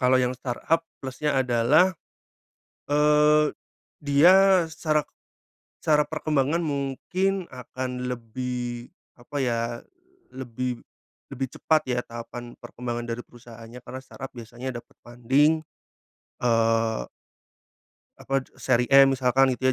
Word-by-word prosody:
kalau 130 0 +4
yang 125 0 +1
startup 130 +6 -1 0.2
plusnya 135 +2 -2
adalah, 130 +8 +4 1.0
eee, 150 +1 +4 0.5
dia 180 +6 +5
secara 155 -2 -1 0.8
secara 150 -1 +3
perkembangan 150 0 0
mungkin 170 +6 -2
akan 125 0 -5
lebih 125 0 -5 0.2
apa 120 +4 -14
ya, 120 -3 0 0.7
lebih 125 -1 -4 0.6
lebih 135 +1 -3
cepat 155 -1 +2
ya 125 -1 +1
tahapan 120 +1 -8
perkembangan 120 0 -5
dari 115 +1 -4
perusahaannya 120 0 -13
karena 130 +1 -8
startup 135 - -9
biasanya 120 +2 -7
dapat 120 - -14
funding 135 +7 +2 0.8
eee 115 - +1 1.1
apa 135 -1 -1 0.2
seri 125 -2 +2
M 135 0 +8
misalkan 130 +1 +3
gitu 130 0 +2
130 Hz, 105 wpm, -25 LUFS, 120-150 Hz, 1.1 s, M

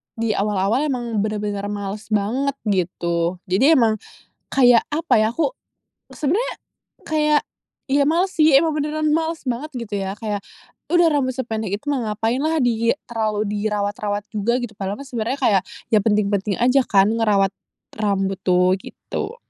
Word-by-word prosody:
di 230 -1 -1
awal-awal 205 +6 +1
emang 240 -5 -2
bener-bener 205 -1 -2
males 205 +1 -5
banget, 235 +7 0
gitu. 175 -3 0 0.2
Jadi 270 - +5
emang 220 -3 +3 0.5
kayak 245 -3 +5
apa 325 +3 +1
ya, 215 +1 +2
aku 325 - 0 0.6
sebenernya, 385 - 0 0.5
kayak 300 -1 +2 0.5
ya 280 +1 +3
males 350 +5 +2
sih 310 0 +5
emang 320 +4 +4
beneran 305 +1 -1
males 325 0 -1
banget 255 +6 -3
gitu 230 -4 -4
ya. 190 - -3
Kayak 210 -3 -3 0.5
udah 345 -1 +5
rambut 260 -3 +1
sependek 220 -6 -2
itu - - -30
mah 240 -6 -1
ngapain 225 +4 -1
lah 320 +1 +1
di 230 -1 +2 0.2
terlalu 215 -2 -1
dirawat-rawat 205 0 -2
juga 235 +4 +1
gitu 240 -3 -5
padahal 195 +1 -4
mah 280 - -9
sebenernya 245 +1 -3
kayak 210 -7 +3 0.3
ya 215 - +5
penting-penting 205 -2 +1
aja 255 +3 +4
kan 195 0 +4
ngerawat 210 -4 +2 0.4
rambut 195 -2 -1
tuh, 180 0 +3
gitu. 430 +3 -6
225 Hz, 150 wpm, -21 LUFS, 205-275 Hz, 0.6 s, Jadi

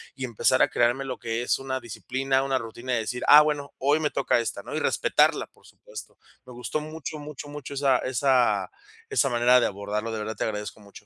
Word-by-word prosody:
y 130 -1 -4
empezar 125 +2 +2
a - - +2
crearme 120 +3 +1
lo 130 -1 -5
que 115 0 -3
es - - 0
una 130 -1 -3
disciplina, 130 +3 -2
una 135 -1 0
rutina 120 +1 -5
de 120 - +1
decir: 125 +3 -4
"Ah, 150 - +10
bueno, 145 -2 -2
hoy 145 +3 +2
me 155 -2 0
toca - - +1
esta, 115 - -4
¿no?", - - -7
y - - 0
respetarla, - - +2
por - - -23
supuesto. - - -12 0.3
Me 125 - -12
gustó 125 +5 -3
mucho, 155 0 -7
mucho, 145 -1 -9
mucho 145 -1 -8
esa 135 -2 +3
esa 125 -5 +2 0.5
esa - - +2
manera 120 0 +4
de 120 - +2
abordarlo. 105 +2 -3
De 110 - -3
verdad 110 +1 -5
te - - -1
agradezco 105 0 -5
mucho. 100 0 -15
125 Hz, 215 wpm, -26 LUFS, 115-135 Hz, 0.5 s, Ah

